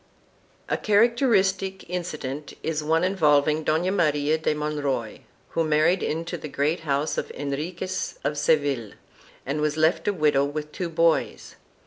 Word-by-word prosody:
4 - - 0
A - - -16
characteristic 205 -4 +2
incident 155 -5 -5
is 160 -1 -1
one 160 +2 +2
involving 155 -4 +3
Dona 160 +5 +1
Maria 150 -4 +1
de 155 -1 0
Mon 150 0 -3
roy, 130 -6 -2 0.3
who 165 - 0
married 155 +4 +2
into 165 +2 -3
the 155 - -6
great 150 +4 0
house 145 -1 -1
of - - -5
Henriquez 150 +7 -4
of 140 +2 -1
Seville, 145 -7 +1 0.5
and 145 +3 -2
was 150 0 0
left 160 +5 +2
a 205 - +2
widow 150 -5 +2
with 150 +1 -4
two 175 +1 -4
boys. 165 0 0
155 Hz, 150 wpm, -25 LUFS, 145-175 Hz, 0.5 s, involving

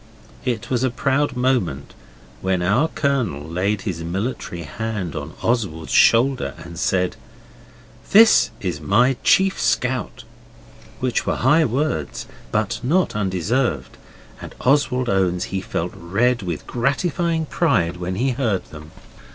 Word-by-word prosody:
It 120 -3 -2
was 125 0 +1
a 130 - +2
proud 135 +2 0
moment 125 - 0 0.5
when 95 -2 0
our 105 - +3
Colonel 125 - -1
laid 100 +5 -1
his 90 -6 -4
military 95 0 -4
hand 100 0 -4
on 75 +2 -6
Oswald's 100 -10 -1
shoulder 130 +3 +4
and 85 0 -9
said 90 -1 0 0.9
'This 220 +2 +6
is 90 -6 -3
my 125 +6 +3
chief 195 0 +3
scout' 125 0 -1 0.8
which 130 -2 -1
were - - +1
high 150 +6 +4
words, 120 - -2 0.3
but - - -1
not 165 +6 +1
undeserved, 95 - -1 0.5
and - - -9
Oswald 130 -2 +2
owns 95 -3 +1
he 95 - -1
felt 90 -2 -3
red 110 +8 0
with 85 -5 -5
gratifying 160 +6 0
pride 90 - +1
when 90 +1 -4
he 130 +6 +1
heard 115 -7 -1
them. 75 0 -11
110 Hz, 130 wpm, -21 LUFS, 90-130 Hz, 0.9 s, This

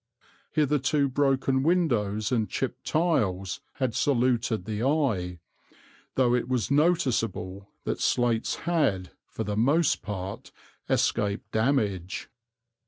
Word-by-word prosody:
Hitherto 145 -1 +2
broken 135 -1 +1
windows 120 - +1
and 110 -4 +1
chipped 130 -1 -3
tiles 100 - 0
had 130 -4 -1
saluted 120 -6 +1
the 110 0 -3
eye, 120 - 0 0.8
though 125 -2 +3
it 125 0 0
was 130 0 0
noticeable 115 - +1
that - - -3
slates 120 -2 +1
had, 140 - +1 0.2
for 110 - -5
the 105 -1 -3
most 145 +9 +2
part, 100 -1 -6 0.4
escaped 100 0 0
damage. 110 -7 0
120 Hz, 105 wpm, -27 LUFS, 105-140 Hz, 0.8 s, though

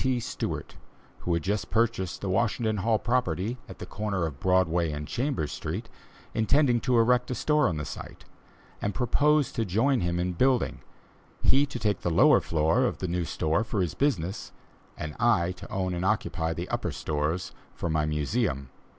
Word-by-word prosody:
T. 130 -2 +1
Stewart, - - -4 0.4
who 85 - -1
had 85 - -2
just 100 +2 -1
purchased 110 -5 0
the 100 - -3
Washington 110 +1 +1
Hall 110 +3 +2
property, 120 -1 -1
at - - -9
the - - -7
corner 100 -5 -2
of 70 -4 -5
Broadway 90 -2 +2
and 75 0 -5
Chambers 125 - -1
Street, - - -5 0.4
intending 120 +3 +3
to 125 0 +1
erect 125 +2 +3
a 125 - -1
store 150 +2 +2
on 85 - -1
the 75 - -3
site, 75 - -9 0.6
and 100 - -2
proposed 145 +3 +2
to 115 - 0
join 115 +7 +2
him 85 0 0
in 90 +1 -1
building, 130 +7 +1 0.6
he 140 +2 +4
to 130 - -6
take 105 -5 0
the - - 0
lower 80 - +5
floor 80 +10 +2
of - - -1
the 95 - -3
new 90 0 -1
store 80 +4 0
for 115 -2 -3
his 90 -5 0
business, 100 - -1 0.5
and 75 -1 -5
I 100 -7 +3
to 95 +2 -10
own 95 -1 -1
and 90 +1 -2
occupy 85 -5 0
the 85 +1 -4
upper - - -1
stories 75 +4 -2 0.2
for - - -3
my 80 -2 +1
Museum. 75 - -1
95 Hz, 185 wpm, -27 LUFS, 85-120 Hz, 0.6 s, lower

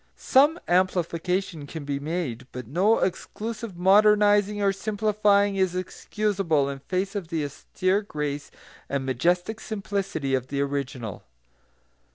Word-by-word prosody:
Some 295 +6 +4
amplification 180 -2 0
can 155 0 -7
be 140 -1 -2
made, 140 -6 -3
but 125 -1 -7
no 185 - +3
excessive 215 +2 -3
modernising 205 +2 +4
or 200 -1 +2
simplifying 205 -1 +2
is 185 -2 +1
excusable 185 -5 -1
in 140 -1 -5
face 185 +7 -2
of 200 -5 -4
the 160 -3 -2
austere 185 +7 -1
grace 150 -7 -4 0.4
and 140 -1 -1
majestic 175 - 0
simplicity 195 - -3
of 130 -1 0
the 140 +1 -3
original. 140 -6 -3
185 Hz, 125 wpm, -25 LUFS, 145-205 Hz, 0.4 s, Some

